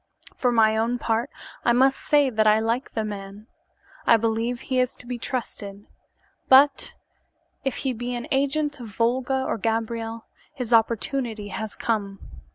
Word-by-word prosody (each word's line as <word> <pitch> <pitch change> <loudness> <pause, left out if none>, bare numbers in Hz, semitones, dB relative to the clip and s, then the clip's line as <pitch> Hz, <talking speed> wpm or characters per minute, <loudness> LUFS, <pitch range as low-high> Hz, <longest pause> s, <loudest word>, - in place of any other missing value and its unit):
For 250 - +1
my 220 -2 +4
own 230 +2 0
part, 230 +2 -1 0.3
I 235 - +4
may 265 +3 +5
say 285 0 +2
that 215 -1 +2
I 215 0 +6
like 230 +4 -2
the 220 - 0
man. 205 0 -7 0.6
I 230 - +7
believe 230 +2 -1
he 260 -1 -1
is 250 0 0
to - - -6
be 245 0 -5
trusted, 205 -5 -5 0.6
but 275 +2 +5 0.7
if 270 - -1
he 260 - +1
be 245 +1 -4
an 240 - -4
agent 290 +2 0
of 240 - -7
Volga 250 +5 0
or 230 - -2
Gabriel, 225 +1 -2 0.3
his 250 -3 -3
opportunity 225 -1 +1
has 220 +1 -5
come. 200 -4 -2
230 Hz, 160 wpm, -24 LUFS, 220-255 Hz, 0.7 s, I